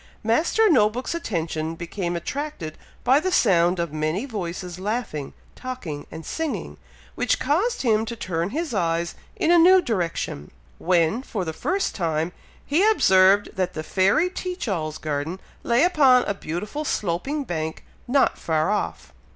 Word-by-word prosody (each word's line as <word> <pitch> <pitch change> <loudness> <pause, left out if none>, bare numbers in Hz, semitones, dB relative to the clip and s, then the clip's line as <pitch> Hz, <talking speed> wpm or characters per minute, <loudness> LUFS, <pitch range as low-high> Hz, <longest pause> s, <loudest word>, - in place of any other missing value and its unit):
Master 315 - +3
No 235 - +5
book's 250 +7 -4
attention 165 - -3
became 175 +1 -4
attracted 230 - -4 0.3
by 260 +3 +5
the 370 +4 -1
sound 180 - +3
of 170 -3 -2
many 155 - -1
voices 180 -6 -5
laughing, 205 - -3 0.2
talking, 200 - -6
and 160 0 -9
singing, 320 -2 -4 0.4
which - - +1
caused 390 - 0
him 220 -3 +3
to 235 - -4
turn 175 -5 -2
his 310 +4 -3
eyes 170 -3 0 0.2
in 325 - +1
a 345 - +7
new 370 +3 +7
direction, 170 - -2 0.3
when, 175 +5 +2
for 210 -8 -4
the 160 - -3
first 375 - -1
time, 165 -2 -1 0.3
he 315 +7 +2
observed 190 - +5
that 185 -1 -1
the 155 - -3
fairy 195 - +2
Teach 365 -4 -4
all's 155 -6 -2
garden 155 +4 -3 0.2
lay 235 +3 +3
upon 275 -8 +5
a - - -1
beautiful 200 - -5
sloping 270 - -1
bank 160 -7 -4 0.2
not 265 +2 +2
far 160 +3 0
off. 210 - -3
195 Hz, 150 wpm, -24 LUFS, 170-275 Hz, 0.4 s, a